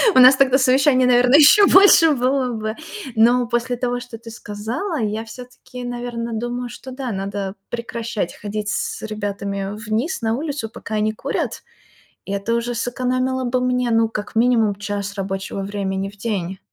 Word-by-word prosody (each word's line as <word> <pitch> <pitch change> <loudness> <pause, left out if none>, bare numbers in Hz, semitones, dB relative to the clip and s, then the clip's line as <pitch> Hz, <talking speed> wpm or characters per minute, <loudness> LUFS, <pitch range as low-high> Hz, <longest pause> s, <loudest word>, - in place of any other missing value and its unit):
У - - +7
нас 255 +1 +9
тогда 265 -1 +4
совещаний, 260 0 +4
наверно, 250 +1 +4
ещё 310 +8 +8
больше 380 -4 +7
было 260 -1 +1
бы. 215 -1 -4 0.4
Но 240 +2 +4
после 240 +1 -1
того, 245 0 -1
что 245 -2 -9
ты 230 0 -11
сказала, 225 - -4
я 215 0 -2
всё-таки, 250 +1 -11
наверно, 240 -1 -4
думаю, 240 +2 -3
что 260 +2 -10
да, 255 -1 -5
надо 195 0 -4
прекращать 230 -5 -4
ходить 210 0 -5
с 190 - -3
ребятами 200 -2 -4
вниз 225 - -2
на 225 0 0
улицу, 280 -4 -4
пока 220 0 -7
они 215 0 0
курят, - - -3 0.6
и - - -6
это 200 +3 -1
уже 235 +1 -1
сэкономило 255 +2 -1
бы 250 0 0
мне, 250 -1 0
ну, 225 0 +3
как 210 -1 -6
минимум, 225 -3 +3
час 205 0 -4
рабочего 195 0 -4
времени 195 -1 -3
в 205 - -17
день. 195 -4 -3
235 Hz, 165 wpm, -20 LUFS, 210-250 Hz, 0.6 s, нас